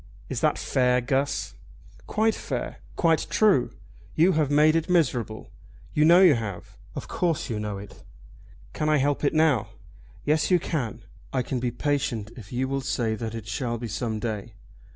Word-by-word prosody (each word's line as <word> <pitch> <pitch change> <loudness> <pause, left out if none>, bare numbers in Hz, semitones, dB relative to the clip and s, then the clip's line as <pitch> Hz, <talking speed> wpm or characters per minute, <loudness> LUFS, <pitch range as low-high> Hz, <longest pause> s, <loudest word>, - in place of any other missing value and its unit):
"Is - - -3
that - - +2
fair, 125 -1 +2
Guss?" 135 +3 -1 0.5
"Quite 220 +1 +2
fair! - - -4 0.2
Quite 165 -2 +2
true! 205 - +3 0.5
You 170 +4 +5
have 155 -4 +1
made 150 +2 +5
it 165 +2 0
miserable. 125 -11 0 0.4
You 150 - +3
know 170 +3 +7
you 175 -5 +8
have. 110 -6 -5 0.2
Of - - -6
course 165 -7 -1
you 110 - -2
know 105 -1 -3
it." 100 0 -11 0.7
"Can 155 - -1
I 155 - +4
help 145 +1 0
it 145 - +1
now?" 155 -9 +3 0.6
"Yes 150 +1 +2
you 180 - +5
can. 145 - -3 0.3
I 130 -2 0
can 130 - -3
be 125 0 -1
patient 120 -4 -2
if 110 -5 -12
you 130 +1 -1
will 135 0 -2
say 120 -4 -1
that 115 0 -4
it 115 -3 -6
shall 120 +2 -2
be 120 +1 -5
some 110 +1 -3
day. 110 0 -4
130 Hz, 175 wpm, -26 LUFS, 115-155 Hz, 0.7 s, you